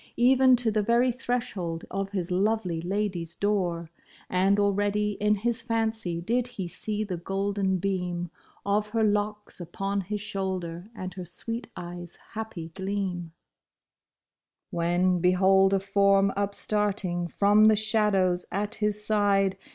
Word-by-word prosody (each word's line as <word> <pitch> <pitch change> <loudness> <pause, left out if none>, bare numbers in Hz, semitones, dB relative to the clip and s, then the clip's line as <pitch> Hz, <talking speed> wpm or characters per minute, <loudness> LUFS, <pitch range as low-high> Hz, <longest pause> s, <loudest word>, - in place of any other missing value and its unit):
Even 255 +1 +6
to 240 -2 +1
the 215 0 +1
very 235 +4 +3
threshold 210 -9 -3
of 195 +1 -2
his 185 -3 -3
lovely 190 -3 0
lady's 180 -2 -2
door. 175 -5 -1 0.4
And 190 +2 +3
already 205 +1 +1
in 210 0 +3
his 230 +3 -1
fancy 225 -6 -1
did 235 +6 0
he 190 -3 -3
see 210 +4 -3
the 190 -4 -4
golden 195 +1 -1
beam 180 -2 -2 0.3
Of 210 +1 +1
her 220 - +3
locks 210 -1 -1
upon 195 +3 -2
his 210 +3 -4
shoulder 190 -3 -4
and 185 -3 -6
her 185 -1 -7
sweet 230 +7 -4
eyes' 175 -1 -7 0.2
happy 210 -7 -6
gleam: 190 -3 -3 1.4
When 175 +2 +1
behold 190 +2 +4
a 195 - +3
form 195 0 +3
upstarting 200 -3 0
from 205 +4 +4
the 215 0 +6
shadows 205 -4 +2
at 205 +2 -2
his 210 0 +1
side. 200 -2 +2
200 Hz, 135 wpm, -27 LUFS, 180-210 Hz, 1.4 s, Even